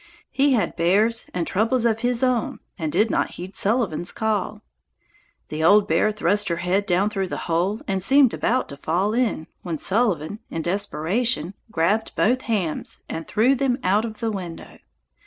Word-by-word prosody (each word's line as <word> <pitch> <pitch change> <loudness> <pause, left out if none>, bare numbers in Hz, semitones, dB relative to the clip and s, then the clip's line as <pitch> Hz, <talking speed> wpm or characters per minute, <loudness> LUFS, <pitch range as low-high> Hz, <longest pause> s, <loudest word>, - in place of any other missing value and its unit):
He 275 0 +3
had 230 - 0
bears 205 +7 +2
and 175 -2 -2
troubles 225 +6 +1
of 225 -1 +2
his 245 +1 0
own 250 -3 0 0.2
and 160 -2 -2
did 210 +7 +2
not - - 0
heed 185 +3 -8
Sullivan's 200 -6 +1
call. 215 -1 -2 0.9
The 155 +1 -3
old 205 +4 +5
bear 215 - +2
thrust 205 0 +1
her 170 - 0
head 180 +4 -1
down 195 +4 +2
through 195 -2 -2
the - - -5
hole 180 +7 0
and 195 -2 -1
seemed 265 +4 +5
about 255 +2 0
to 140 - -8
fall 185 +8 0
in, 230 -9 0 0.2
when 170 -3 -4
Sullivan 200 -2 0
in 165 - -4
desperation 195 +1 -1 0.2
grabbed 205 +5 0
both 250 +4 +2
hams 185 -8 -2
and 165 0 -6
threw 230 +5 +3
them 260 -2 0
out 200 +4 +2
of 225 0 -7
the 225 -1 0
window. 180 -5 -7
205 Hz, 175 wpm, -23 LUFS, 175-230 Hz, 0.9 s, old